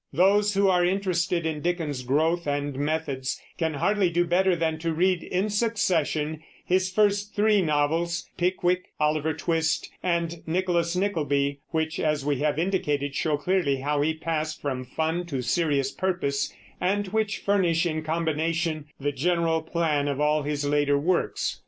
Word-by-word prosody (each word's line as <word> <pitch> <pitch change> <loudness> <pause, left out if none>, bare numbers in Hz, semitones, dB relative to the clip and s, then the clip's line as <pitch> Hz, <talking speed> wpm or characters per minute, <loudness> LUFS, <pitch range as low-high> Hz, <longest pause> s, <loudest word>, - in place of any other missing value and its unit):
Those 200 +5 +3
who 200 0 +4
are 180 -2 +3
interested 180 -2 0
in 155 -2 -2
Dickens's 165 -6 -2
growth 160 +6 +1
and 145 -1 -1
methods 145 -2 -2 0.2
can 160 -2 0
hardly 195 +5 +2
do 175 +1 +1
better 180 +2 +3
than 160 -1 -1
to 165 +1 -1
read 180 +1 +2
in 190 +3 -1
succession 165 -8 0 0.2
his 185 +1 +2
first 205 +1 +1
three 210 -1 +4
novels, 165 +2 0
Pickwick, 180 0 +1
Oliver 155 0 +1
Twist, 160 0 0
and 170 -2 -1
Nicholas 170 0 0
Nickleby, 145 -7 0
which, 160 0 -1
as 150 -2 0
we 145 -3 0
have 150 -1 0
indicated, 150 -6 0
show 150 0 0
clearly 170 -2 +1
how 145 +1 0
he 160 +2 +1
passed 155 -1 -3
from 130 -3 -3
fun 160 +6 -2
to 135 -6 -3
serious 140 0 +1
purpose, 175 -7 -1 0.3
and 200 +2 0
which 215 +1 0
furnish 185 -4 +2
in 155 -2 -1
combination 160 0 -1
the 145 +1 -1
general 165 +3 +1
plan 160 -3 0
of 140 -1 -2
all 150 +1 +2
his 145 0 -2
later 145 0 +2
works. 170 +5 0
165 Hz, 155 wpm, -26 LUFS, 150-180 Hz, 0.3 s, who